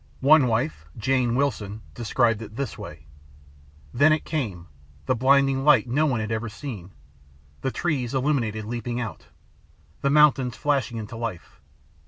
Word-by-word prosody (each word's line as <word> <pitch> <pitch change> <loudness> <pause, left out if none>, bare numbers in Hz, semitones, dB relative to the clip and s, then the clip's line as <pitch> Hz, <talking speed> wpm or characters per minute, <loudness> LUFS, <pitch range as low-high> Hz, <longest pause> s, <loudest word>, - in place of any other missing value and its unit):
One 145 0 +6
wife, 80 -10 -1
Jane 125 +1 +1
Wilson, 110 -6 -2
described 115 - +1
it 110 -1 -9
this 140 +2 -3
way, 75 -8 -10 0.9
"Then 145 +6 +5
it 155 - +1
came. 110 - -3 0.4
The - - +2
blinding 135 +2 +3
light 140 -5 +5
[no] 145 +6 +2
one 125 -5 0
had 110 0 -4
ever 110 0 -2
seen. 105 - -8 0.7
The - - -1
trees, 135 -4 -2
illuminated, 125 -6 0
leaping 120 +1 -4
out. 115 -4 -6 0.7
The 140 - +1
mountains 140 -4 +4
flashing 135 -6 0
into 110 +1 -7
life. 115 -7 -6
120 Hz, 145 wpm, -24 LUFS, 110-140 Hz, 0.9 s, One